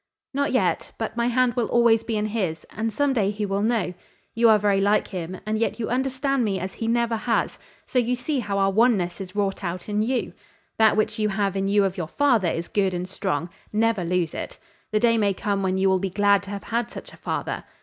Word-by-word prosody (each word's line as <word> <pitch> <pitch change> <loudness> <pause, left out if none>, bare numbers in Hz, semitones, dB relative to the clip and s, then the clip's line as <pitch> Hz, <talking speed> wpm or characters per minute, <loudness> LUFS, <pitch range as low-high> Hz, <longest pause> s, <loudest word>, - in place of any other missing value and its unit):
"Not 280 +1 0
yet, 215 -9 0
but 225 0 -4
my 235 0 +1
hand 245 0 +2
will 240 -2 0
always 235 -2 +4
be 225 -2 -2
in 210 - 0
his, 195 -7 -2
and 225 +1 -2
some 285 +3 +1
day 210 -6 +2
he 210 0 -2
will 195 0 -1
know. 215 -5 0 0.4
You 230 0 +4
are 215 - +7
very 200 -1 +2
like 205 +2 +2
him, 180 -1 -5
and 215 0 -1
yet 225 0 -1
you 220 - -2
understand 265 +1 0
me 195 -3 0
as 185 +1 -5
he 225 - -4
never 235 0 +1
has, 230 +1 -1 0.3
so 255 - +1
you 245 +1 +1
see 260 +3 -2
how 200 -4 -2
our 195 0 +3
oneness 200 -4 +2
is 185 0 -8
wrought 200 -1 -1
out 175 0 -4
in 210 0 0
you. 245 +3 -1 0.5
That 220 -1 +5
which 215 - 0
you 210 0 +2
have 195 -1 0
in 195 0 0
you 205 0 +3
of 190 -1 -2
your 170 -3 -3
father 235 - +2
is 165 +1 -3
good 195 -3 0
and 180 +1 -3
strong: 170 -2 -3 0.2
never 225 -2 +1
lose 175 -1 0
it. - - -6 0.3
The 215 - +2
day 230 0 +3
may 200 -2 +2
come 200 +1 -1
when 190 -1 0
you 190 0 +2
will 190 -1 +3
be 195 +1 -2
glad 200 +1 +3
to - - -9
have 200 -1 -5
had 235 0 -2
such - - -10
a - - -14
father. - - -3
210 Hz, 240 wpm, -24 LUFS, 195-235 Hz, 0.5 s, are